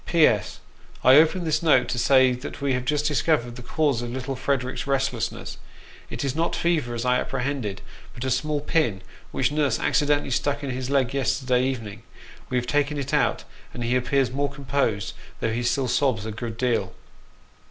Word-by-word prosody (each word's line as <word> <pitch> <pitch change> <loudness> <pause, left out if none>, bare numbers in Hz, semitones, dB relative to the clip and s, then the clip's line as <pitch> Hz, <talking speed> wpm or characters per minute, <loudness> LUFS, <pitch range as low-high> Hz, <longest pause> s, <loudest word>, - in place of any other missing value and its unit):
" - - -27
P.S. 150 - +3 0.4
I 130 - +7
open 165 +4 +4
this 160 -2 0
note 150 -7 +4
to 120 - -1
say 130 +1 +5
that 125 +2 -6
we 140 -2 0
have 125 0 -2
just 150 +2 0
discovered 145 -5 +1
the 125 - -9
cause 140 -1 0
of 120 - -4
little 130 +2 -4
Frederick's 130 0 -2
restlessness. 135 -4 -2 0.5
It - - -4
is 135 0 -1
not 165 +1 0
fever, 155 -9 0
as 115 +1 -3
I 125 0 +2
appre 125 - -3
hended, 125 -8 -3 0.3
but 120 - -6
a 130 - -1
small 145 +4 0
pin, 140 -11 0 0.3
which - - 0
nurse 145 -4 +1
accidentally 145 -1 +1
stuck 145 +3 0
in 135 - -2
his 130 0 -4
leg 135 -3 +1
yesterday 130 -2 +1
evening. 115 -5 -3 0.5
We 125 - 0
have 120 - 0
taken 145 +2 0
it 140 -2 -4
out, - - +2 0.3
and 120 - -4
he 120 +2 +1
appears 130 +1 +1
more 140 +2 -1
com 140 -1 -11
posed, 125 -7 0 0.3
though 110 - -1
he 120 - -1
still 130 +2 0
sobs 125 -3 +1
a 110 - -4
good 115 +1 -6
deal." 115 -7 0
130 Hz, 195 wpm, -24 LUFS, 120-145 Hz, 0.5 s, I